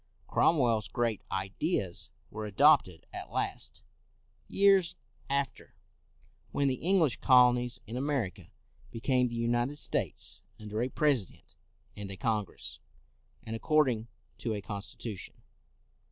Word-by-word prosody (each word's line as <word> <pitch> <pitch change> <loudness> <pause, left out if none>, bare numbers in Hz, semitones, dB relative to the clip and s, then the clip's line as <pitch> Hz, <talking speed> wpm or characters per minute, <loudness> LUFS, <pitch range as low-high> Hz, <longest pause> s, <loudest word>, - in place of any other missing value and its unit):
Cromwell's 120 -9 +3
great 120 -4 -1
ideas 95 - -2 0.2
were 105 0 -4
adopted 125 - +4
at - - -6
last, - - -3 0.6
years 195 -3 +4 0.3
after, 140 -1 -2 0.8
when 140 - +1
the 130 -2 -1
English 170 -6 +3
colonies 125 -2 +5
in 110 - -7
America 130 -7 -2 0.4
became 125 +1 +1
the 120 - -5
United 120 +4 0
States, - - -2 0.2
under 105 +1 -3
a 125 - 0
President 135 - 0 0.4
and 100 -1 -6
a 95 - -6
Congress, 105 -3 -2 0.6
and 110 - -4
according 125 -4 +2 0.3
to 110 -2 -2
a - - -3
constitution. 100 +1 -7
120 Hz, 110 wpm, -31 LUFS, 110-140 Hz, 0.8 s, colonies